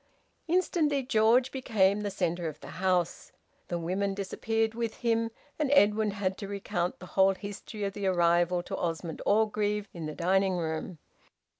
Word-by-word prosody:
Instantly 320 -5 +1
George 245 +1 +3
became 210 -6 +2
the 205 - -2
centre 175 -3 -1
of 155 -2 -6
the 180 - -9
house. 180 -2 0 0.4
The 175 - -2
women 190 +4 -1
disappeared 225 +3 -1
with 230 -1 -3
him, 230 -1 0 0.3
and 300 -3 +1
Edwin 215 -4 +4
had 195 -2 -2
to 200 - -5
recount 190 -3 -2
the - - -10
whole 195 0 +4
history 205 +2 -7
of 195 -1 -2
the 200 -1 -2
arrival 175 0 +3
to - - -5
Osmond 165 -1 -3
Orgreave 210 -1 +1
in 165 -3 -5
the 155 - -6
drawing 190 +2 +2
room. 160 +1 -3
200 Hz, 160 wpm, -29 LUFS, 180-220 Hz, 0.4 s, Edwin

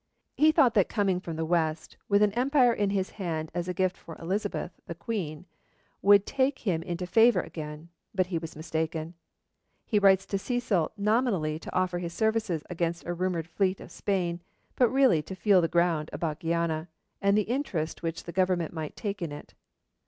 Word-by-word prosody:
He 310 +1 +5
thought 255 -6 +4
that 200 -4 +3
coming 195 -5 +1
from 170 -3 -6
the 160 0 -2
west, 160 -1 -1
with 200 0 +5
an 210 - +3
empire 250 +1 +3
in 205 -3 0
his 195 -1 -1
hand 160 -5 -4
as 175 0 -2
a - - -1
gift 185 -1 +1
for 165 - -11
Elizabeth, 195 +1 -2 0.2
the 170 - -5
Queen 175 -6 -4 0.6
would 200 0 +6
take 270 0 +1
him 175 -7 -1
into 175 +1 -4
favour 225 0 +5
again, 155 +1 -8 0.2
but 185 -2 +1
he 175 -2 -2
was 160 -1 -8
mistaken. 160 +1 -3 0.7
He 210 - +2
writes 195 -1 +5
to 195 - -2
Cecil 210 -8 0
nominally 200 -8 +1
to - - -9
offer 185 -1 +1
his 170 -1 -5
services 220 -7 0
against 170 -1 -2
a 175 - -2
rumoured 175 -2 -2
fleet 185 +2 0
of - - -11
Spain, 180 -4 -1 0.3
but 245 -3 +4
really 260 - +4
to 190 +5 -8
feel 190 0 +4
the 165 - +2
ground 165 -2 +1
about 155 -2 -3
Guiana, 165 -1 -1 0.3
and 200 +1 +3
the 210 - +3
interest 200 - -2
which 165 -1 -3
the 170 - -7
Government 185 -3 +1
might 155 -2 -5
take 200 -3 -4
in 165 -3 -3
it. 145 - -10
180 Hz, 190 wpm, -28 LUFS, 165-205 Hz, 0.7 s, would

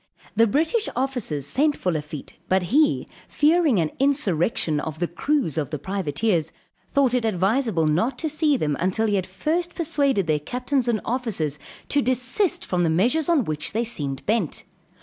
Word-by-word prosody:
The 230 0 +4
British 320 - +1
officers 245 - -2
sent 285 - +1
for 180 - -1
Lafitte; 150 -2 -5 0.2
but 190 0 +3
he, 300 +1 +3 0.2
fearing 305 - +3
an 160 -3 +1
insurrection 190 - +1
of 155 0 -5
the 175 +1 -1
crews 235 - 0
of 145 - -3
the 150 - -3
privateers, 175 0 -1 0.4
thought 275 -3 +2
it 250 -2 +1
advisable 210 -2 +1
not 180 - +1
to 320 - -2
see 305 -1 +2
them 150 - 0
until 190 +5 +1
he 210 - 0
had 190 -2 0
first 325 - -2
persuaded 285 - +1
their 155 -2 +1
captains 250 - -1
and 230 -3 +1
officers 215 - -2 0.3
to 285 - +3
desist 255 - 0
from 180 -1 0
the 170 - +2
measures 245 - +2
on 305 -9 +3
which 155 -1 -3
they 225 +2 +1
seemed 145 - -3
bent. 215 -7 0
225 Hz, 170 wpm, -24 LUFS, -, 0.4 s, The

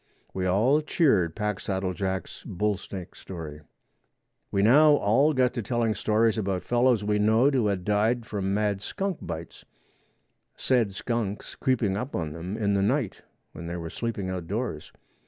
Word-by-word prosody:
We 95 -1 -1
all 115 +11 +3
cheered 110 - +2
Packsaddle 100 -3 -2
Jack's 95 +1 -4
bull 105 +3 -1
snake 95 -1 -8
story. 80 -5 -8 0.9
We 100 - +1
now 145 +7 +7
all 135 +6 +3
got 130 -3 +2
to 120 - -2
telling 115 0 0
stories 110 +1 +1
about 95 -3 -2
fellows 120 +1 +2
we 105 0 +1
knowed 110 +7 +4
who 125 -5 +2
had 95 -3 -1
died 110 +3 +1
from 100 -4 -2
mad 100 -1 0
skunk 195 - -3
bites, 85 -1 -7 0.9
said 115 -7 +1
skunks 110 -2 -3
creeping 115 -7 0
up 125 +6 -4
on 80 -4 -3
them 90 +6 -5
in 100 -2 +1
the 100 - +2
night 120 +1 0 0.3
when 85 - -8
they 85 +1 -4
were 85 -1 -6
sleeping 115 -5 -3
outdoors. 95 0 -4
105 Hz, 155 wpm, -27 LUFS, 95-120 Hz, 0.9 s, now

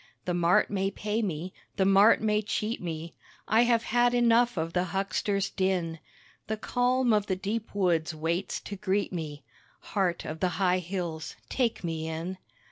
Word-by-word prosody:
The 180 - 0
mart 175 +2 +3
may 195 -1 0
pay 210 +2 -2
me 180 -3 -3 0.2
the 190 - +2
mart 195 +3 +6
may 210 -1 +2
cheat 215 +2 -2
me, 165 -1 -5 0.3
I 225 +3 +4
have 235 -1 +3
had 240 +1 +2
enough 240 -2 +4
of 165 +1 -2
the 180 0 +1
huckster's 195 +1 -1
din, 180 -4 -1 0.5
The 220 - -2
calm 245 +2 +2
of 210 -1 +2
the 190 - +1
deep 205 +3 -4
woods 175 -5 +2
waits 165 +4 -2
to 205 - -6
greet 200 0 -1
me, 155 -4 -5 0.5
(Heart 185 -5 0
of 155 +1 -5
the 185 - +2
high 185 -1 +3
hills, 170 -3 -4 0.2
take 240 -6 0
me 160 -2 -3
in.) 165 +4 -4
190 Hz, 170 wpm, -28 LUFS, 170-215 Hz, 0.5 s, mart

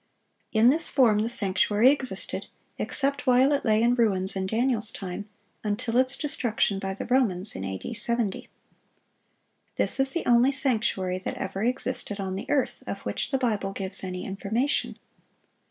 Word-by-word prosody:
In 225 +3 +5
this 325 +3 +2
form 230 -6 +4
the 220 +2 0
sanctuary 210 +2 +3
existed—except 280 +1 -3
while 255 +3 +5
it 280 - 0
lay 220 0 +3
in 240 +1 +4
ruins 195 -5 +1
in 190 0 -2
Daniel's 225 0 +1
time—until 205 +3 -6
its 260 +1 +2
destruction 230 -8 0
by 195 -1 -4
the - - -6
Romans, 215 -7 +1
in 95 - -5
A.D. 95 - -5
70. 230 -2 -1 1.3
This - - 0
is 270 0 +4
the 340 - -2
only 245 +3 +5
sanctuary 215 -9 0
that 190 - -5
ever 195 +1 -4
existed 250 -3 -2
on 190 -1 -3
the 195 - -6
earth, 280 -3 0
of - - -3
which - - -3
the 270 - +1
Bible 210 -6 -1
gives 195 0 -4
any 180 -1 -5
information. 220 +8 -1
220 Hz, 155 wpm, -26 LUFS, 195-255 Hz, 1.3 s, In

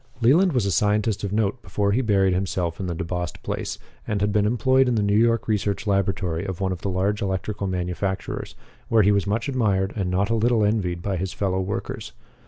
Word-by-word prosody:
Leland 155 +10 +4
was 125 -6 +1
a 100 - 0
scientist 105 0 +1
of 100 - -2
note 110 +3 0
before 100 -1 -1
he 120 +6 +2
buried 100 -5 +2
himself 90 -2 -2
in 95 - -3
the 85 - -3
DeBost 90 -1 -4
place, - - -3 0.3
and 105 -3 -1
had 105 +1 +1
been 105 0 +3
employed 130 +3 +3
in 125 - +1
the 105 - +1
New 100 0 +1
York 115 +1 +3
research 105 -2 -1
laboratory 95 -4 0
of 95 -3 -5
one 95 -1 0
of 90 - -4
the 100 - -2
large 95 +3 0
electrical 100 +1 -2
manufacturers, 90 +1 -3 0.3
where 110 -2 +5
he 100 - +4
was 100 -3 +1
much 110 +7 -1
admired 105 -7 +1
and 95 -4 -1
not 95 +4 0
a - - +3
little 115 0 +2
envied 90 -5 -1
by 100 -2 -1
his 95 +1 -3
fellow 95 -2 -1
workers. 95 +2 -4
100 Hz, 215 wpm, -24 LUFS, 95-110 Hz, 0.3 s, where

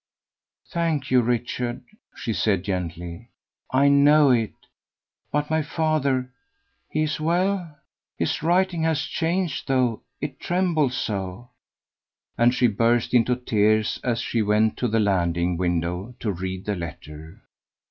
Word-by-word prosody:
"Thank 160 -6 -1
you, 125 -1 +5
Richard," 120 +1 -2 0.3
she 115 - -3
said 100 -4 +1
gently, 90 +2 -5 0.4
"I 135 +2 +3
know 140 0 +6
it; 115 -4 +1 0.8
but 150 +1 -1
my 160 0 +2
father, 145 -5 0 0.6
he 155 - 0
is 155 - -2
well? 175 0 0 0.4
His - - -1
writing 175 +1 +2
has 160 -2 +1
changed 170 -1 -2
though, 125 -4 +1 0.2
it 140 -2 -5
trembles 170 -7 +1
so," 100 +3 -4 0.8
and 120 +2 +4
she 125 0 +2
burst 115 +2 +2
into 125 0 +4
tears 110 -3 +1
as 120 -2 0
she 115 - -1
went 105 +1 +2
to 125 - 0
the 115 0 +1
landing 90 -4 +1
window 90 +5 -2
to 105 - -1
read 95 0 -5
the 105 - -1
letter. 80 -1 -9
120 Hz, 130 wpm, -24 LUFS, 100-150 Hz, 0.8 s, know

